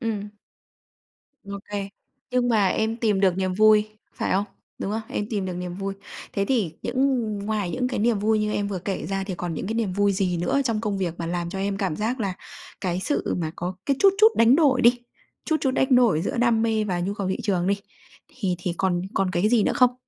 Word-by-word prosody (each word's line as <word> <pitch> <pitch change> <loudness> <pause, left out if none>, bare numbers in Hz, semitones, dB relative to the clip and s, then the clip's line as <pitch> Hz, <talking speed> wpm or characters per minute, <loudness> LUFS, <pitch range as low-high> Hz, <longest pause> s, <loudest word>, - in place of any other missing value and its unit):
Ừm. 210 -4 -3 1.1
Ô 200 0 -6
kê. 200 -1 -3 0.4
Nhưng 250 -1 +1
mà 210 -5 +3
em 220 +4 0
tìm 215 -5 +1
được 185 -2 +3
niềm 185 -1 -1
vui, 215 +1 +5 0.3
phải - - -1
không? 195 +2 +2 0.3
Đúng 195 - -3
không? 220 - -1
Em 205 - -3
tìm 200 -4 -1
được 180 - -3
niềm 180 0 -5
vui. 195 +1 -4 0.4
Thế 200 - 0
thì 210 -8 0
những 255 -2 +1
ngoài 205 -2 -2
những 250 +7 -1
cái 255 - -3
niềm 225 0 +2
vui 215 +1 +2
như 210 0 0
em 200 0 -1
vừa 190 -2 -3
kể 195 +2 -4
ra 195 0 -2
thì 190 -2 -4
còn 175 -1 -4
những 155 - -4
cái 220 - -2
niềm 225 -5 -1
vui 200 +1 +2
gì 185 -2 0
nữa 175 +11 +1
trong 225 -4 0
công 210 -3 -2
việc 175 -4 -2
mà 170 - -3
làm 175 0 -2
cho 195 - -5
em 195 0 -1
cảm 190 -6 -2
giác 230 +4 -2
là 195 -3 -1 0.5
cái 180 -1 -1
sự 290 +9 -1
mà 160 -2 -2
có 180 +2 -3
cái 275 -2 +2
chút 390 -1 +6
chút 435 - +8
đánh 230 +4 +6
đổi 275 -6 +4
đi, 245 +1 +5 0.5
chút 315 - +1
chút 270 - +1
đánh 265 0 +2
đổi 220 -11 +4
giữa - - -2
đam 235 -2 +3
mê 220 -2 +1
và 180 -3 -1
nhu 195 +3 -2
cầu 200 -2 -3
thị 190 - 0
trường 185 -4 0
đi, 200 +1 +1 0.5
thì 195 -7 -2
thì 180 -1 -2
còn 180 -2 +1
còn 195 -1 +1
cái 180 +4 +1
gì 230 -2 +4
nữa - - +1
không? 250 -1 +4
205 Hz, 240 wpm, -24 LUFS, 185-230 Hz, 1.1 s, chút